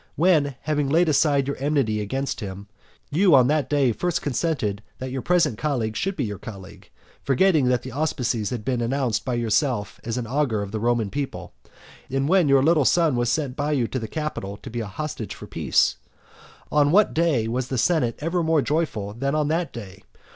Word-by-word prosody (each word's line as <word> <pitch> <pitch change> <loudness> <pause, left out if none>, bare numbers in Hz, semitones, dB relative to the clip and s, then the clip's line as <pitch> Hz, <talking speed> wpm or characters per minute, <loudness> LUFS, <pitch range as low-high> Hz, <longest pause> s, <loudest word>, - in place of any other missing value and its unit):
when, 155 -5 +3
having 150 -2 -1
laid 165 +4 +3
aside 145 -2 +2
your 140 - -2
enmity 135 -7 0
against 135 +7 -3
him, 100 -2 -7 0.5
you 175 +1 +5
on 130 -2 +6
that 145 -1 +1
day 140 -4 +3
first 175 +8 -1
consented 125 -8 -1 0.2
that 130 0 -6
your 130 0 -3
present 155 -8 +1
colleague 120 -7 -1
should 195 - -1
be 145 - -1
your 105 -4 -4
colleague, 95 -3 -11 0.3
forgetting 150 +1 +3
that 125 -1 +1
the - - -7
auspices 125 -6 -1
had 120 -4 -5
been 125 -2 0
announced 120 -3 0
by 125 - -2
yourself 120 -1 0
as 115 +1 -3
augur 125 -3 -1
of 100 - -7
the 110 - -3
Roman 115 -2 0
people; 140 -1 -5 0.6
and 135 +1 0
when 180 -3 +4
your 135 -1 +5
little 160 -1 +4
son 165 0 +3
was 120 -1 +1
sent 140 -4 -1
by 150 +1 -1
you 125 -5 +1
to 130 - -2
the 110 - -5
Capitol 110 -9 -4
to 130 - -8
be 120 - -3
a 110 - -4
hostage 150 +8 -5
for - - -10
peace. - - +1 0.7
On 145 -1 +3
what 205 +4 +4
day 155 -9 +1
was 125 +2 -2
the 130 - -3
senate 125 -3 +1
ever 170 +3 0
more 160 -3 +2
joyful 135 -10 -1
than 140 +5 -2
on 150 -1 +1
that 165 +2 -1
day? 95 -5 -9
135 Hz, 200 wpm, -24 LUFS, 115-155 Hz, 0.7 s, on